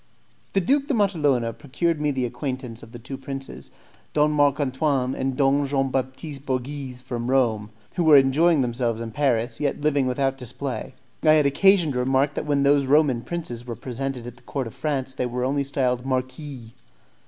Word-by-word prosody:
The 195 - +3
Duke 275 +9 +2
de 285 - +1
Matalona 150 - +1
procured 155 +4 -2
me 150 - +1
the 130 -3 0
acquaintance 125 -2 -5
of 115 - -13
the 120 - -8
two 130 +3 -8
princes, 135 - -7 0.4
Don 150 0 +3
Marc 145 -1 +3
Antoine 135 -1 0
and 130 -1 -2
Don 140 0 +3
Jean 135 -1 0
Baptiste 135 +2 -4
Borghese, 130 -1 -4
from 120 -1 -4
Rome, 115 -6 +1 0.3
who 175 - +2
were 155 -3 +8
enjoying 145 +4 +4
themselves 120 -2 -1
in 115 -1 -5
Paris, 120 -3 0
yet 145 0 -1
living 145 -3 +2
without 135 +1 0
display. 125 +1 -5 0.3
I 155 -1 +5
had 150 -2 +4
occasion 175 +3 +4
to 125 - -2
remark 135 +3 +2
that 150 - -4
when 140 -1 +2
those 140 -1 +3
Roman 140 -4 +3
princes 125 -4 -5
were 120 - -4
presented 125 +1 -4
at 120 0 -9
the - - -19
court 135 -3 -4
of 115 - -8
France 135 -4 -2
they 125 -1 -2
were 125 +1 -3
only 140 +2 0
styled 125 -3 0
"marquis." 130 -2 -4
135 Hz, 190 wpm, -24 LUFS, 125-145 Hz, 0.4 s, were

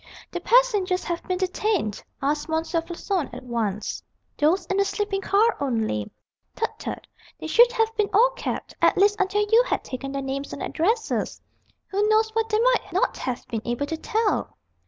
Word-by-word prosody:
"The - - -4
passengers 415 -7 +3
have 345 -1 -3
been 365 - 0
detained?" 370 - -1 0.2
asked 295 +3 0
M. 320 - +1
Floçon 340 +1 -2
at 255 - -8
once. 220 -4 -2 0.3
"Those 335 +5 +2
in 380 +3 -1
the 395 - +4
sleeping 395 0 -2
car 430 +4 +3
only 225 - -1 0.2
" - - -52
"Tut, 450 - -1
tut! - - -5 0.3
they - - -7
should 475 +10 +6
have 450 -1 +1
been 415 -2 +1
all 480 +5 +5
kept - - -5
at - - +4
least 405 +1 +4
until 415 +2 +1
you 455 +2 +7
had - - -1
taken 270 +1 -6
their 275 0 -3
names 275 +1 -4
and - - -5
addresses. 440 +8 -1 0.5
Who 405 +2 +1
knows 440 0 +3
what 450 0 0
they 430 -1 +2
might - - +2
not - - +1
have 250 -1 -4
been 230 -3 -3
able 240 +4 -2
to 320 +2 -4
tell?" 440 +4 -1
380 Hz, 185 wpm, -24 LUFS, 280-440 Hz, 0.5 s, you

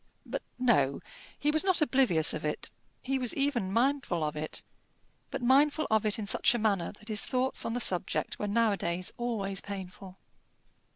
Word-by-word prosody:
But - - -4 0.2
no: 170 - +2 0.4
he 295 - +1
was 315 +2 +3
not 375 -2 +2
oblivious 255 - +3
of 155 - -5
it. 150 0 -3 0.3
He 265 +1 -1
was 250 -2 -1
even 275 -9 0
mindful 235 - +1
of 150 0 -2
it; 155 +1 -5 0.7
but - - -5
mindful 285 +5 +4
of 220 0 +3
it 210 - 0
in 215 - -4
such 235 +4 +3
a - - +1
manner 205 -6 0
that 210 +1 -18
his 210 -2 +2
thoughts 255 +1 0
on 230 - -2
the - - 0
subject 185 -3 0
were 210 - -2
nowadays 200 -5 0
always 200 -5 -2
painful. 190 -1 -8
220 Hz, 175 wpm, -30 LUFS, 185-255 Hz, 0.7 s, mindful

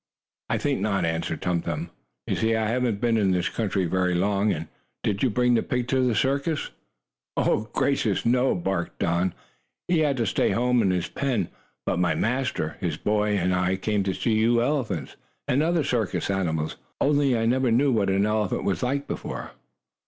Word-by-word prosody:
"I - - +1
think - - 0
not," 100 -3 0
answered 80 -1 -2
Tum 90 -2 +1
Tum. 85 +1 -4 0.3
"You - - -1
see 115 0 +1
I 110 -1 0
haven't 120 -2 0
been 115 -1 +2
in 100 -3 +2
this 90 -1 +1
country 100 -4 -1
very 90 +1 +1
long. 100 -3 +1 0.4
Did 100 -1 -1
you 130 - +3
bring 125 +2 +2
the 115 - +3
pig 125 -3 -2
to 130 0 +2
the 125 -3 +2
circus?" 140 +5 0 1.0
"Gracious, 120 -8 +1
no!" 125 +2 +3
barked 90 -1 -2
Don. 90 -1 0 0.5
"He 175 -2 +2
had 145 -3 +2
to 115 - +1
stay 100 - +1
home 125 0 +2
in 100 - +2
the 90 -1 0
pen. 120 -10 0 0.4
But 90 - 0
my 90 - +2
master, 125 -9 -1
his 85 -5 -2
boy 105 0 +1
and 90 0 +1
I 90 +1 +1
came 105 +2 0
to 95 - 0
see 115 - 0
you 115 +2 +3
elephants, 115 - -2 0.3
and 130 +4 +2
other 165 0 +2
circus 115 -7 -1
animals. 80 -5 -1 0.2
Only 140 -3 +3
I 115 - 0
never 130 +2 +2
knew 130 +5 +3
what 105 -5 +2
an 100 +1 +2
elephant 105 -2 0
was 95 -4 -1
like 140 +3 -1
before." - - -5
105 Hz, 185 wpm, -25 LUFS, 90-125 Hz, 1.0 s, you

